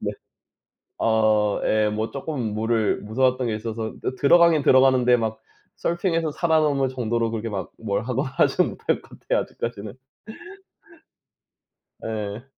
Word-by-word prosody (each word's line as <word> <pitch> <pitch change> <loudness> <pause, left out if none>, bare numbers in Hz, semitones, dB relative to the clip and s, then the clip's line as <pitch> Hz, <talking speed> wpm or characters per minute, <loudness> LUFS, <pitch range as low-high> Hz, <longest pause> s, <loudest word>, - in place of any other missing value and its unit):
네. - - -3 0.9
어 110 -2 +2
예 110 0 +2
뭐 110 +1 -3
쪼끔 135 -6 -4
물을 110 0 0
무서워했던 125 +4 +1
게 110 - -1
있어서 110 0 -5
또 130 - -2
들어가긴 165 +2 +5
들어가는데 130 -2 +5
막 110 -2 -3 0.4
서핑에서 165 -2 -1
살아남을 155 -4 +1
정도로 120 -2 -1
그렇게 115 0 -4
막 100 -3 -5
뭘 100 -2 -2
하거나 130 +3 -2
하지는 - - +2
못할 - - -2
것 - - -16
같아요 - - 0
아직까지는. 110 -3 -6 2.1
예. 110 +1 -5
115 Hz, 295 characters per minute, -23 LUFS, 110-135 Hz, 2.1 s, 들어가긴